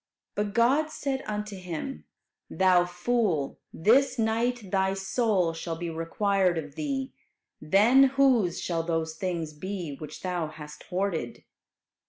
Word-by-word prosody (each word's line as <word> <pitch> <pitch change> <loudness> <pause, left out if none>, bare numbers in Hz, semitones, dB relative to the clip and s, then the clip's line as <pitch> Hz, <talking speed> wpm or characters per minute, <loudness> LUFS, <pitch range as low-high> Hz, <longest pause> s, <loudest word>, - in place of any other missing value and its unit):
'" - - -64
But 205 0 -2
God 270 +7 +3
said 275 -3 -3
unto 210 -1 -4
him, 185 - -6 0.4
"Thou 185 -2 +4
fool, 175 - -1
this 255 - +3
night 225 -2 0
thy 190 0 +1
soul 195 -3 +1
shall 165 0 -4
be 170 0 -4
required 180 +2 +1
of 150 -3 -5
thee; 270 - -3 0.5
then 215 - +6
whose 260 -9 +3
shall 170 -2 -1
those 165 -1 -2
things 165 -2 -3
be 175 -2 -5
which 155 - -9
thou 180 -3 -1
hast 150 -1 -10
hoarded?" 180 -10 -2
190 Hz, 135 wpm, -27 LUFS, 165-230 Hz, 0.5 s, then